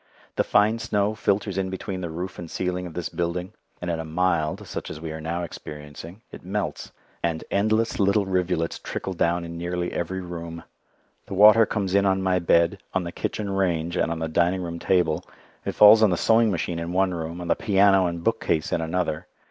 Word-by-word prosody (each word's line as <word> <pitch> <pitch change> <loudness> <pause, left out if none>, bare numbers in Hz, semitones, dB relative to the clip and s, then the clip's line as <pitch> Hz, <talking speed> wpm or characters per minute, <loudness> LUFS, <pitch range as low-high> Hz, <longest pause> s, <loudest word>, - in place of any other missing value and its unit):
The - - +2
fine 110 +2 +3
snow 105 -1 0
filters 100 -2 0
in 95 -1 -1
between 95 0 -5
the 85 - -4
roof 90 +3 -6
and 85 -2 -7
ceiling 90 +1 -2
of 85 - -11
this 90 - -2
building, 90 +3 -3 0.3
and 90 -1 -3
in 85 - -2
a - - -3
"mild," 80 -1 0
such - - -5
as - - -7
we 80 0 -6
are 80 0 -6
now 85 +2 -3
experiencing, 75 +5 -9
it - - -11
melts, 100 +3 -4 0.3
and 85 -2 -1
endless 110 +3 +1
little 100 +1 +3
rivulets 90 -3 -1
trickle 95 - -5
down 85 0 0
in 85 0 -7
nearly 90 0 -3
every 95 +2 -3
room. 85 -2 -7 0.6
The - - -5
water 105 +2 +7
comes 100 -3 -2
in 100 0 +4
on 95 0 +1
my 95 -1 +2
bed, 85 +2 +3 0.2
on 95 - +1
the 85 - -5
kitchen 105 +3 -3
range, 85 -3 0
and 85 - +1
on 85 - -2
the 80 0 -2
dining 85 +3 +1
room 85 -1 -5
table. 90 -2 +1 0.4
It - - -3
falls 105 +1 +8
on 110 - +6
the 90 - +1
sewing 115 +3 +4
machine 85 -2 -2
in 85 +1 -4
one 95 0 +2
room, 85 0 -5
on 90 - -6
the - - +3
piano 95 -2 +4
and 85 -1 -4
bookcase 110 -8 0
in 85 - 0
another. 80 -1 -2
90 Hz, 210 wpm, -24 LUFS, 85-95 Hz, 0.6 s, falls